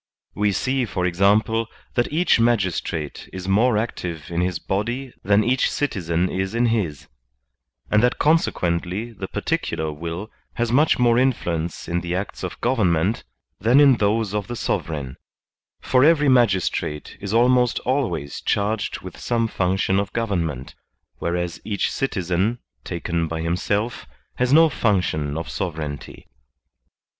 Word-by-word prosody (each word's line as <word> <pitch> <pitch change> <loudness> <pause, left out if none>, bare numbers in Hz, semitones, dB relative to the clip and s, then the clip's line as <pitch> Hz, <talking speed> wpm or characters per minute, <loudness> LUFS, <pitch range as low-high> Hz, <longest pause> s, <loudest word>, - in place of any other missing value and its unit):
We 105 0 +1
see, 130 +6 0
for 95 -4 -2
example, 105 +5 +2 0.3
that 120 -1 0
each 165 -4 +3
magistrate 95 -9 -1
is 95 0 -7
more 110 +4 +3
active 90 -8 -4
in 85 +1 0
his 90 -1 0
body 120 +9 -3
than 100 +2 +4
each 125 +3 +2
citizen 90 - -1
is 95 +3 -3
in 120 +1 +3
his, 85 - -2 0.8
and 105 - +5
that 125 +1 +2
consequently 100 - +1
the - - -6
particular 80 -1 -2
will 85 +7 -6 0.2
has 120 -1 0
much 150 +5 +4
more 120 -1 +4
influence 85 -10 -1
in 85 +1 -1
the 85 +1 -3
acts 95 +2 -4
of - - -5
government 105 -5 +1 0.3
than 120 +6 +4
in 140 -4 +6
those 105 0 +1
of 105 -2 -2
the 120 - -5
sovereign; 75 - -3 0.6
for 130 0 +3
every 150 -2 +5
magistrate 95 - +1
is 100 -1 -4
almost 125 +1 +3
always 125 - -2
charged 105 +1 -1
with 90 -2 -10
some 115 -1 0
function 95 -1 +1
of 100 -1 -3
government, 85 - -2 0.5
whereas 85 0 -2
each 105 -2 -1
citizen, 95 -3 -1 0.3
taken 85 -1 -2
by 80 0 -4
himself, 100 +8 -1 0.3
has 125 0 +1
no 160 +3 +7
function 90 - 0
of 80 - -4
sovereignty. 75 -5 -5
100 Hz, 140 wpm, -22 LUFS, 85-120 Hz, 0.8 s, no